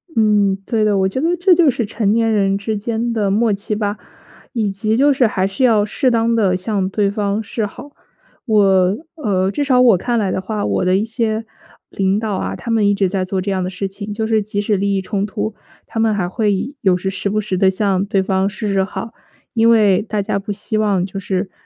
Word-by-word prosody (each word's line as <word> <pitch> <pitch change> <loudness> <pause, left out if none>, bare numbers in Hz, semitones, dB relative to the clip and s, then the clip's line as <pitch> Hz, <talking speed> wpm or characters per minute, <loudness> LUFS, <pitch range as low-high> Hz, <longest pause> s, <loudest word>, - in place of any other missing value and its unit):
嗯， 210 -3 +3
对 225 -2 0
的， 210 -1 +2
我 190 0 +2
觉 225 +8 -3
得 335 +3 +1
这 360 +2 +4
就 340 -4 +4
是 240 -3 -1
成 210 0 -1
年 225 +1 +2
人 195 -2 +2
之 215 +2 -3
间 230 +2 -2
的 210 -3 0
默 215 +2 +2
契 200 +2 -3
吧。 205 0 -2 0.6
以 220 -5 0
及 215 +3 -1
就 285 +2 +4
是 260 -3 +3
还 190 -3 -1
是 195 +7 -2
要 220 -4 +4
适 255 +5 0
当 230 -1 +1
地 195 -5 +2
向 190 -1 -1
对 200 0 +1
方 205 +1 -1
示 220 +1 -3
好。 285 +8 -12 0.5
我 195 -4 +3 0.3
呃， 190 -3 +1
至 290 - -1
少 260 -3 +3
我 245 -5 +6
看 240 +6 -1
来 200 -4 0
的 - - -2
话， 210 +2 -3
我 - - 0
的 185 0 +2
一 205 - 0
些 225 -1 -2 0.5
领 195 +1 0
导 220 -2 -2
啊， - - -3
他 235 - -5
们 220 -2 +2
一 205 - +3
直 195 -1 +1
在 190 0 -1
做 190 +1 -2
这 195 +2 -2
样 190 -1 -1
的 180 - -2
事 195 +1 -4
情， 200 +2 -7
就 220 +2 -2
是 220 -1 +2
即 205 0 -3
使 205 +1 +1
利 200 +1 0
益 195 - 0
冲 195 +1 -2
突， 215 +1 -3 0.3
他 225 - -5
们 225 -1 +2
还 185 -3 -1
会 210 +6 -1
有 190 -4 +3
时 190 +1 -3
时 195 +1 -3
不 210 +2 0
时 205 -3 -2
地 190 - +5
向 190 -1 0
对 195 -2 0
方 190 0 0
示 205 0 -3
示 195 -1 +2
好， 220 +4 -6 0.4
因 230 0 +3
为 210 -5 +4
大 215 0 -3
家 200 0 -1
不 205 +2 -6
希 215 +2 -2
望 200 -4 +1
就 195 +1 -6
是， 190 0 -3
205 Hz, 260 characters per minute, -18 LUFS, 195-225 Hz, 0.6 s, 我